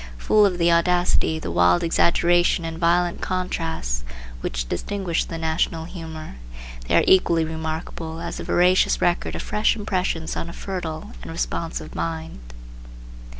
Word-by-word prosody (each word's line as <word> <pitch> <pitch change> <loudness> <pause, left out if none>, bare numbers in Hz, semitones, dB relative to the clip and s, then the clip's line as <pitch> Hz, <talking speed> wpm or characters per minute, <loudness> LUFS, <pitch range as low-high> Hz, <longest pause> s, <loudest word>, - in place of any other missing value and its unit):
Full 210 - +4
of 180 -2 -2
the 170 0 +3
audacity, 175 -1 +2
the 155 - -5
wild 90 +1 +4
exaggeration 170 +1 +3
and 165 0 -5
violent 175 0 +2
contrasts 165 - -2 0.4
which - - -3
distinguish 180 - -2
the 165 - -6
National 160 0 -1
humor, 160 - -8 0.5
they - - +2
are - - +5
equally 170 -3 +4
remarkable 160 0 -5
as 170 0 -5
the - - -5
veracious 180 +1 +3
record 175 0 0
of - - -4
fresh 210 +2 +1
impressions 185 -6 -2
on 170 - -4
a - - -8
fertile 170 -5 -5
and - - -9
responsive 165 0 -3
mind. 160 - -4
165 Hz, 145 wpm, -23 LUFS, 160-180 Hz, 0.5 s, are